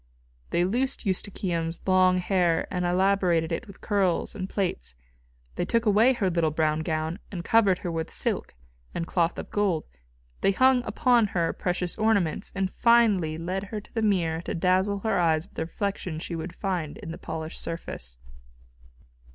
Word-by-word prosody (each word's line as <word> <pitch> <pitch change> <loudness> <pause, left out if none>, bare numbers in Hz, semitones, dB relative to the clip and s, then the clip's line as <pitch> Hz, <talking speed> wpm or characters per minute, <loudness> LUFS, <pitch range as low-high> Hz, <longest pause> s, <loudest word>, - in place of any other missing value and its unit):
They 175 - +2
loosed 250 +7 -1
Eustochium's 180 -4 -2
long 185 -1 +4
hair 180 -2 +1
and 180 -1 0
elaborated 180 -2 +2
it - - -2
in 200 - -11
curls 195 -3 0
and 190 -2 -5
plaits; 175 - -2 0.6
they - - 0
took 230 0 +1
away 220 +5 +5
her 210 -6 0
little 170 -3 +1
brown 155 0 +1
gown 160 +2 -2
and 175 -4 -5
covered 210 -5 +4
her 175 - -1
with 160 -1 -3
silk - - -2 0.4
and 170 - -2
cloth 170 -1 0
of - - -7
gold; 195 -6 +1 0.6
they 195 - +3
hung 260 +2 +4
upon 235 +1 +3
her 170 -1 +1
precious 180 -1 -2
ornaments, 200 -6 +1
and 195 -1 -1
finally 210 -10 +3
led 185 +4 -3
her 210 +2 -5
to 205 - -18
the 225 - -1
mirror 170 -6 +1
to - - -4
dazzle 185 +3 +1
her 220 -3 +1
eyes 160 -2 +2
with - - -24
the 160 - -3
reflection 185 -1 -3
she 170 +1 -4
would 165 +2 -6
find 180 -7 -3
in 165 - -7
the - - -7
polished 160 0 -5
surface. - - -6
185 Hz, 170 wpm, -26 LUFS, 165-200 Hz, 0.6 s, away